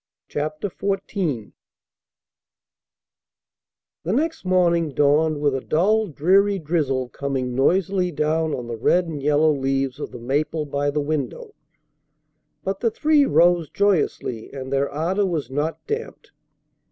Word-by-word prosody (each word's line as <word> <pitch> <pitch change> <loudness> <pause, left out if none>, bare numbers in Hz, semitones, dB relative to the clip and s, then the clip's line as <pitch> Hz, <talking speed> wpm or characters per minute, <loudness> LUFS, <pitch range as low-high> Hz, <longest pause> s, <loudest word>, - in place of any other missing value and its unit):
CHAPTER 155 +5 -3
XIV 190 - -3 2.5
The 170 - -3
next 320 +8 -1
morning 175 -3 +2
dawned 150 +1 +3
with 145 -1 +1
a 135 - -2
dull, 210 +10 +2
dreary 195 +6 +3
drizzle 145 -6 -1
coming 135 -3 -3
noisily 180 +7 +1
down 160 0 0
on 125 - -6
the 115 -1 -5
red 175 +10 +2
and 155 -4 -5
yellow 150 +2 +3
leaves 135 -1 -1
of - - -5
the - - -9
maple 145 +6 -1
by 145 0 -1
the 150 +1 -1
window; 145 -3 -3 1.1
but 195 0 -2
the 230 - +2
three 295 +3 +3
rose 175 - +3
joyously 175 - 0
and 135 -1 -6
their 140 +1 +1
ardor 180 +7 0
was 155 -8 -3
not 150 +4 -2
damped. 440 +2 -5
155 Hz, 130 wpm, -22 LUFS, 140-185 Hz, 2.5 s, dawned